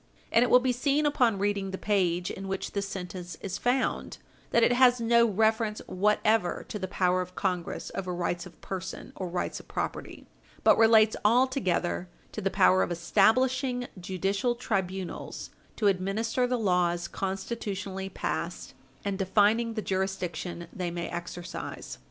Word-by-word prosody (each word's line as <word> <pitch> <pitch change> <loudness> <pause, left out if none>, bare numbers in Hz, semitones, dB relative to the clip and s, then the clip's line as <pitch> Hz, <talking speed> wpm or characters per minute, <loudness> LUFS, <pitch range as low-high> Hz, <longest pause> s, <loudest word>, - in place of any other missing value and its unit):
And 230 - +5
it 245 - +3
will 250 - +7
be 255 0 +1
seen 280 +4 +1
upon 250 -7 +3
reading 200 0 0
the 190 - -4
page 180 -4 0
in 195 0 -6
which 195 0 -3
this 200 -1 -2
sentence 180 -2 -6
is 195 +1 -4
found 250 +1 0 0.3
that 235 - +3
it 245 - +5
has 250 0 +5
no 235 0 +4
reference 220 +1 +1
whatever 210 0 +1
to 210 - -4
the 190 - -3
power 185 0 +1
of 180 0 -7
Congress 180 -3 -2
over 185 -1 -3
rights 175 0 -2
of 180 - -18
person 190 -1 -6
or 185 - -4
rights 175 +1 -3
of - - -15
property, - - -5 0.4
but - - +7
relates 220 -1 +5
altogether 210 -7 +1 0.2
to 215 - -5
the 195 - +1
power 185 -1 +4
of - - 0
establishing 245 +8 +2
judicial 195 +6 -1
tribunals 190 -6 -3 0.2
to 215 - -2
administer 205 +6 +1
the 250 0 0
laws 180 -5 +1
constitutionally 195 -1 -4
passed, - - -4 0.3
and 200 -1 -2
defining 215 +4 +2
the 215 - -2
jurisdiction 185 -3 -3
they 180 -2 -3
may 170 0 -4
exercise. 175 - -6
195 Hz, 155 wpm, -28 LUFS, 185-230 Hz, 0.4 s, will